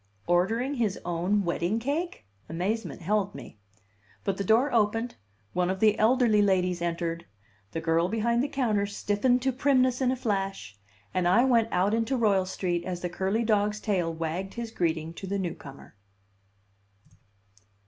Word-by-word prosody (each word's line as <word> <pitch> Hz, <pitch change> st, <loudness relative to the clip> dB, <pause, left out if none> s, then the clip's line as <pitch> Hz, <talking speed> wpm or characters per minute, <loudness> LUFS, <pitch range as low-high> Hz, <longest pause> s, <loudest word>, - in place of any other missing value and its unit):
"Ordering 225 Hz, +10 st, +1 dB
his 225 Hz, -7 st, 0 dB
own 180 Hz, +4 st, 0 dB
wedding 175 Hz, +3 st, 0 dB
cake?" 285 Hz, -, -3 dB, 0.2 s
Amazement 185 Hz, +3 st, -3 dB
held 200 Hz, +2 st, 0 dB
me. 115 Hz, -5 st, -11 dB, 0.6 s
But 195 Hz, -1 st, -1 dB
the 200 Hz, -, -1 dB
door 235 Hz, +8 st, +3 dB
opened, 225 Hz, +2 st, +1 dB, 0.4 s
one 180 Hz, 0 st, +1 dB
of 190 Hz, 0 st, -2 dB
the 215 Hz, 0 st, +3 dB
elderly 225 Hz, -2 st, +4 dB
ladies 180 Hz, -3 st, +1 dB
entered, 170 Hz, 0 st, -2 dB, 0.4 s
the 165 Hz, -, -3 dB
girl 165 Hz, +2 st, +1 dB
behind 235 Hz, +2 st, +1 dB
the 280 Hz, -, 0 dB
counter 220 Hz, -8 st, 0 dB
stiffened 210 Hz, +5 st, +1 dB
to 265 Hz, -, +2 dB
primness 255 Hz, -1 st, +2 dB
in 255 Hz, -, +3 dB
a -, -, 0 dB
flash, 195 Hz, -, -3 dB, 0.4 s
and 185 Hz, -1 st, +1 dB
I 220 Hz, +8 st, +5 dB
went 235 Hz, -4 st, +3 dB
out 190 Hz, +4 st, +2 dB
into 230 Hz, +4 st, 0 dB
Royal 200 Hz, -5 st, +2 dB
Street 175 Hz, -2 st, -2 dB
as 180 Hz, -1 st, -4 dB
the 180 Hz, -, -2 dB
curly 195 Hz, +6 st, -1 dB
dog's 210 Hz, -1 st, +1 dB
tail 185 Hz, -6 st, 0 dB
wagged 165 Hz, +4 st, -4 dB
his 235 Hz, -1 st, -5 dB
greeting 165 Hz, -4 st, -1 dB
to 190 Hz, -, -8 dB
the 200 Hz, +1 st, -1 dB
newcomer. 160 Hz, -, -7 dB
200 Hz, 160 wpm, -27 LUFS, 175-230 Hz, 0.6 s, I